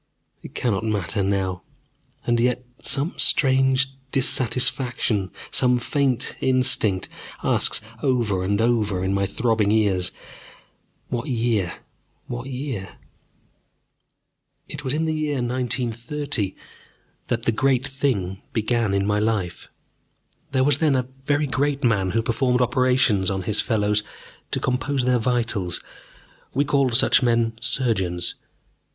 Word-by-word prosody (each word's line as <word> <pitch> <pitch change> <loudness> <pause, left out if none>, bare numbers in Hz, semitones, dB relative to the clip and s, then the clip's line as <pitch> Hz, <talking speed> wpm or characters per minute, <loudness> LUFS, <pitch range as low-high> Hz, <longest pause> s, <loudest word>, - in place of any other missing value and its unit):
It - - -12
cannot 110 -4 -1
matter 105 -2 -1
now. 95 -2 -1 0.6
And 120 -1 +2
yet 125 +1 0 0.2
some 140 +6 +2 0.3
vague 130 -1 +3 0.3
dissatisfaction, 125 -5 +2 0.2
some 125 -1 +4
faint 130 0 0
instinct, 120 -7 +2 0.4
asks - - +4 0.2
over 120 -8 +1
and 100 +2 0
over 110 -5 +1
in 95 +1 0
my 100 0 0
throbbing 110 -3 +1
ears: 100 -5 +2 1.0
What 120 -1 -3
year? 115 -7 0 0.5
What 120 +2 -6
year? 125 -8 -5 1.7
It 145 0 -7
was 130 - -2
in 155 +3 0
the 160 - 0
year 155 -2 -1
1930 125 -1 -2 0.7
that 120 -1 -2
the 115 - +2
great 130 +3 +1
thing 105 -9 -2
began 115 -2 0
in 100 0 +1
my 105 0 +1
life. 105 -5 -2 0.8
There 130 -1 +2
was 145 0 +3
then 155 -4 +3
a 130 -1 -1 0.2
very 145 +1 +2
great 140 +2 -1
man 100 -6 +2
who 115 +3 0
performed 125 +2 +1
operations 125 -5 +2
on 95 -2 -2
his 105 +2 +1
fellows 105 -2 +1 0.5
to - - -1
compose 130 +1 -1
their 125 -1 +2
vitals 115 -7 -1 0.8
we 140 +2 +2
called 140 -4 +1
such 125 - +5
men 115 -2 +2
surgeons. 105 -9 0
120 Hz, 125 wpm, -23 LUFS, 105-130 Hz, 1.7 s, such